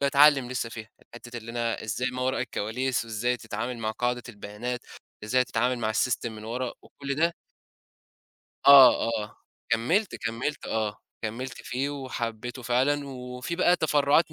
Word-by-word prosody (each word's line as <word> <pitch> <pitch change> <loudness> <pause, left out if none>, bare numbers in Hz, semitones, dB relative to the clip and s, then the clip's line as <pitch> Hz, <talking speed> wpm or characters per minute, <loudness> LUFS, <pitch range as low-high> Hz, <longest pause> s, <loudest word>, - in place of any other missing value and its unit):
بأتعلّم 140 -2 +5
لسه 125 -2 -2
فيها، 110 -1 -8 0.3
حِتّة 120 0 -9
اللي 115 0 -9
أنا 115 -1 -2
إزاي 110 +4 -1
ما 125 0 -4
وراء 130 +1 0
الكواليس 125 +4 -1
وإزاي 115 +2 -1
تتعامل 115 +2 -4
مع 110 -1 -1
قاعدة 120 +2 -1
البيانات، 115 +3 -5 0.4
إزاي 125 +4 +3
تتعامل 125 +2 0
مع 110 -2 0
الsystem 120 +2 0
من 110 -1 -9
ورا 120 +2 -3
وكل 140 -1 -5
ده. 165 +3 +1 1.3
آه، 135 -4 +9
آه، 105 -2 -3 0.4
كمّلت، 175 - +2
كمّلت، 125 +6 -3
آه، 110 -2 -1 0.3
كمّلت 120 +4 -4
فيه 135 +3 -2
وحبّيته 125 -3 -5
فعلًا 135 +4 +1
وفي 125 +4 -5
بقى 180 0 +4
تفرُّعات 150 0 +3
125 Hz, 145 wpm, -27 LUFS, 115-135 Hz, 1.3 s, آه